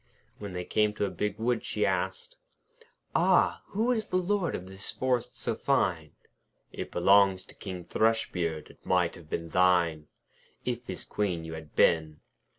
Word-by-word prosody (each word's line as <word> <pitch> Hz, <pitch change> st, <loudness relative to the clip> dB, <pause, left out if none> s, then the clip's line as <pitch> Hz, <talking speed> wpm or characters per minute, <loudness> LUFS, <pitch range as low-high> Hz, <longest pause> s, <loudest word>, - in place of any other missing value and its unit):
When 100 Hz, -3 st, -6 dB
they 90 Hz, 0 st, -4 dB
came 105 Hz, -1 st, +1 dB
to 105 Hz, -, 0 dB
a 100 Hz, -, -3 dB
big 105 Hz, +3 st, -2 dB
wood, 120 Hz, +1 st, 0 dB
she -, -, 0 dB
asked: 480 Hz, +1 st, -2 dB, 0.8 s
'Ah! -, -, +3 dB
who 225 Hz, +5 st, 0 dB
is 220 Hz, -4 st, -1 dB
the 185 Hz, -, 0 dB
Lord 185 Hz, 0 st, 0 dB
of 90 Hz, -, -6 dB
this 95 Hz, +1 st, -6 dB
forest 125 Hz, -1 st, -1 dB
so 115 Hz, -, -1 dB
fine?' 90 Hz, -, 0 dB, 0.6 s
'It -, -, -6 dB
belongs 95 Hz, -2 st, +4 dB
to -, -, -12 dB
King 90 Hz, -4 st, -7 dB
Thrushbeard. 90 Hz, -8 st, 0 dB
It -, -, -24 dB
might 90 Hz, -2 st, +2 dB
have 80 Hz, -2 st, -13 dB
been 85 Hz, +1 st, -3 dB
thine, 85 Hz, -3 st, +3 dB, 0.6 s
If -, -, -3 dB
his -, -, -6 dB
Queen 90 Hz, -5 st, -1 dB
you 80 Hz, -, -6 dB
had 80 Hz, -2 st, -9 dB
been.' 80 Hz, -2 st, +3 dB
95 Hz, 165 wpm, -29 LUFS, 85-115 Hz, 0.8 s, belongs